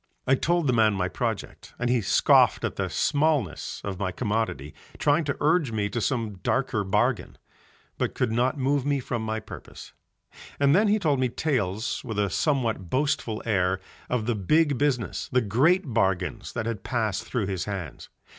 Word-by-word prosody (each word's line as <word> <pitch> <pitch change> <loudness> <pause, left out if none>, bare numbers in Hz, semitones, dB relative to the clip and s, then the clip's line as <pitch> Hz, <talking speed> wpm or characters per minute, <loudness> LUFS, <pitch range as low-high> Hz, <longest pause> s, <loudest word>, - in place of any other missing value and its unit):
I 130 - +3
told 170 +4 +1
the 130 - +3
old - - +1
man 110 -2 +4
my 90 -1 0
project, - - -4
and 120 - -1
he 120 -1 +2
scoffed 100 - +4
at - - -3
the - - -2
smallness 145 - 0
of 95 -2 -5
my 95 -2 -1
commodity 105 - -2 0.2
trying 150 +3 +2
to 140 - -2
urge 155 -4 +2
me 105 -2 -1
to 115 +3 -3
some 110 -3 -2
darker 125 -1 0
bargain, 105 +5 0 0.6
but - - -1
could - - 0
not 125 +5 +1
move 140 +1 +1
me 140 0 +1
from 120 -2 -3
my 110 0 -2
purpose. - - -11 0.7
And 140 +1 +4
then 210 +3 +4
he 210 +1 +3
told 150 -9 +1
me 130 -1 +1
tales 110 - -1
with 110 - -5
a 100 -2 +1
somewhat 115 - 0
boastful 130 -5 -1
air 95 -4 +1 0.3
of 125 -3 0
the 120 - +1
big 145 - +2
business, 135 -7 -1
the 125 - +4
great 135 - +2
bargains 95 -1 0
that 115 - -3
had 115 -4 -3
passed 110 -5 -1
through 120 -6 -2
his 95 -3 -3
hands. 95 -5 -6
115 Hz, 185 wpm, -26 LUFS, 100-140 Hz, 0.7 s, man